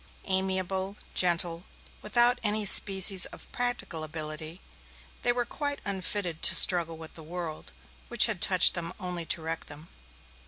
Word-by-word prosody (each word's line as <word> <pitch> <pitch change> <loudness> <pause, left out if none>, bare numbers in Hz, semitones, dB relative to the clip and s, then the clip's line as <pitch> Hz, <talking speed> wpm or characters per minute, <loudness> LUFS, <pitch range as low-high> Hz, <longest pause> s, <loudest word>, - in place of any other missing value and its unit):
Amiable, 190 +1 -3 0.2
gentle, 170 -1 +1 0.4
without 240 +3 +1
any 210 -1 0
species 195 -1 +7
of - - -14
practical 245 -10 -5
ability, 155 +2 -8 0.6
they 240 - 0
were 240 0 -4
quite 285 +3 -6
unfitted 190 -3 -5
to - - +5
struggle 170 -3 +3
with 160 0 -13
the 160 - -10
world, 165 -1 -9 0.4
which - - +1
had - - -5
touched - - +4
them 170 -1 -6
only 180 -3 -7
to 165 -1 -2
wreck 165 0 -7
them. 150 +3 -13
180 Hz, 145 wpm, -25 LUFS, 165-205 Hz, 0.6 s, species